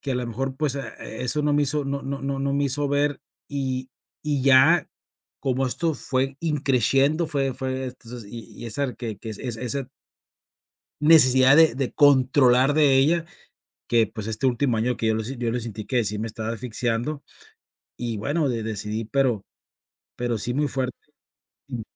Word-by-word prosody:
que 135 - -3
a - - -1
la 125 -1 -2
mejor, 130 +3 -4
pues, 145 -2 0
ah, 140 - -6
eso 125 +6 -2
no 150 0 +1
me 145 0 +3
hizo 145 +1 0
no 140 0 -3
no 135 +1 -4
no 135 0 -2
no 140 0 -1
me 140 0 +1
hizo 140 +1 0
ver 145 0 0 0.3
y 130 -2 -3 0.3
y 145 -3 -1
ya 135 +6 +5 0.5
como 130 0 0
esto 160 +5 -1
fue 135 0 -2
in 155 -3 -1
crescendo 135 +4 +2
fue 135 -4 -1
fue 130 0 -3
entonces 125 -2 -9
y 115 0 -8
y - - -7
esa 125 +3 -2
que 115 -2 -5
r 105 - -8
que 115 - -7
es 105 - -8
esa 125 +2 -4 1.1
necesidad 135 -3 +7
de 160 -6 +6
de 135 -2 -2
controlar 130 -1 +4
de 145 -3 +5
ella, 165 +5 +3 0.6
que 115 -1 +3
pues 110 0 -7
este 110 +4 -2
último 125 -1 +1
año 120 +2 0
que 115 - -1
yo 110 - +2
lo 110 - -2
yo 120 0 -3
lo 125 - -1
sentí 110 -2 -6
que 125 -3 +1
sí 105 0 -2
me 110 - -3
estaba 110 0 -5
asfixiando 120 +5 -3 0.7
y 120 -2 -3
bueno, 145 +9 0
de 115 -4 -2
decidí 110 0 -3
pero 120 -3 0 0.7
pero 120 -2 -2
sí, 120 +4 -1
muy 145 +3 +1
fuerte, 130 -2 -3 0.7
mm. 125 -4 -5
130 Hz, 185 wpm, -24 LUFS, 120-140 Hz, 1.1 s, necesidad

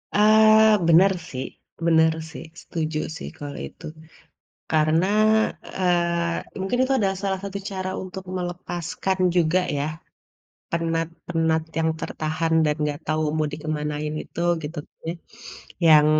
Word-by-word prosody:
Eee, 215 +1 +6
bener 180 +4 +6 0.2
sih 130 0 -4 0.4
bener 160 -1 +5 0.2
sih, - - -8 0.2
setuju 155 -2 -3 0.2
sih - - -7
kalo 145 -1 -6
itu - - -14 0.9
karena, 155 +3 +3 0.7
eee, 170 -2 0
mungkin 195 +6 -1
itu 270 +1 +1
adalah 195 -2 +1
salah 190 -1 0
satu 200 0 -4
cara 185 -1 -3
untuk 190 0 -7
melepaskan 175 +1 -3 0.2
juga 175 +1 +3 0.2
ya 140 - 0 0.9
penat-penat 165 -1 0 0.2
yang 160 0 +2
tertahan 160 +1 -2
dan 150 0 +1 0.2
gak 145 - -8
tau 155 0 +1
mau 155 -1 +1
dikemanain 150 0 -3
itu 170 - -7 0.2
gitu 150 +2 -6 0.3
ya, 165 - -1 0.7
yang 150 -1 +7
165 Hz, 120 wpm, -24 LUFS, 155-185 Hz, 0.9 s, yang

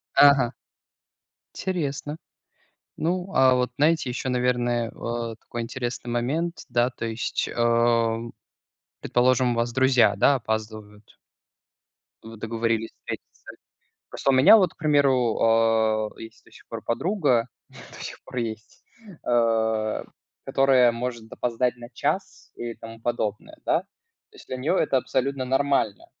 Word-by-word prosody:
Ага. 135 -4 +6 1.0
Интересно. 150 -5 -3 0.8
Ну, 180 +3 -2
а 130 -1 +5
вот 125 0 0
знаете, 155 -2 +2
ещё, 125 +1 -4
наверное, 120 -2 0
а, 115 -1 -4
такой 120 +1 -6
интересный 120 +1 -5
момент. 150 +9 -2
Да, 120 0 +2
то 120 - -7
есть, 115 +1 -2
а, 115 -1 +2 0.8
предположим, 125 0 +2
у - - -1
вас 115 0 0
друзья, 125 -5 +4
да, 140 +8 +4
опаздывают. 110 -3 -5 1.1
Вы 115 0 -10
договорились 115 0 -1
встретиться. - - -9 0.6
Просто - - 0
у - - +3
меня 130 +11 +8
вот, 185 -6 +2
к - - -44
примеру, 140 -6 +2
а, 110 -1 +3
есть 115 0 -12
до - - -22
сих - - -17
пор - - -6
подруга, 130 - +1 0.2
до - - -12
сих - - -8
пор - - -11
есть, 110 -2 -5 0.4
а, 110 -2 +1 0.4
которая 130 -3 +4
может 115 -1 -5
опоздать 125 +1 -1
на 120 -1 -11
час 120 - -3
и 120 -1 -5
тому 115 0 -11
подобное, 115 - -3
да. - - +2 0.5
То 430 - -19
есть, - - -15
для 130 - -3
неё 150 +8 0
это 150 - +2
абсолютно 130 +1 -1
нормально. 135 -5 0
120 Hz, 135 wpm, -25 LUFS, 115-130 Hz, 1.1 s, меня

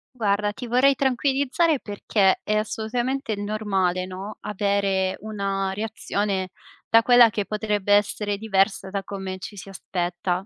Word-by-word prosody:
Guarda, 205 -2 0
ti 245 +1 -7
vorrei 255 +4 +4
tranquillizzare 275 +4 +1
perché 205 -2 +1
è 215 - 0
assolutamente 225 +3 -2
normale, 200 -3 -1
no, 190 +3 -7
avere 200 -2 0
una 195 -2 -2
reazione 205 -2 -2 0.4
da 225 0 +6
quella 240 -1 +6
che 205 -2 -2
potrebbe 210 -1 0
essere 205 0 +1
diversa 195 -2 0
da 200 -1 -3
come 190 -1 -6
ci 205 - -8
si 195 - -9
aspetta. 180 0 -3
205 Hz, 130 wpm, -24 LUFS, 195-220 Hz, 0.4 s, da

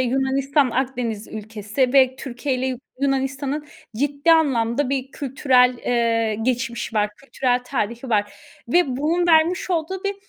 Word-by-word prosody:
Yunanistan 270 +2 +1
Akdeniz 245 -4 -2
ülkesi 220 +4 -2
ve 260 -2 +4
Türkiye’yle 260 0 -3
Yu 255 -2 -3 0.2
Yunanistan’ın 275 +2 -1 0.3
ciddi 285 +5 +2
anlamda 265 -4 +2
bir 270 -1 -2
kültürel, 255 -2 +2
eee, 230 -3 +1
geçmişi 235 -2 -2
var, 210 0 +1
kültürel 255 -2 -1
tarihi 240 -1 -3
var 205 -1 +1 0.4
ve 270 -4 +2
bunun 335 +5 +1
vermiş 340 +3 +3
olduğu 360 +3 -2
bir, 400 - -1
260 Hz, 130 wpm, -22 LUFS, 235-280 Hz, 0.4 s, ve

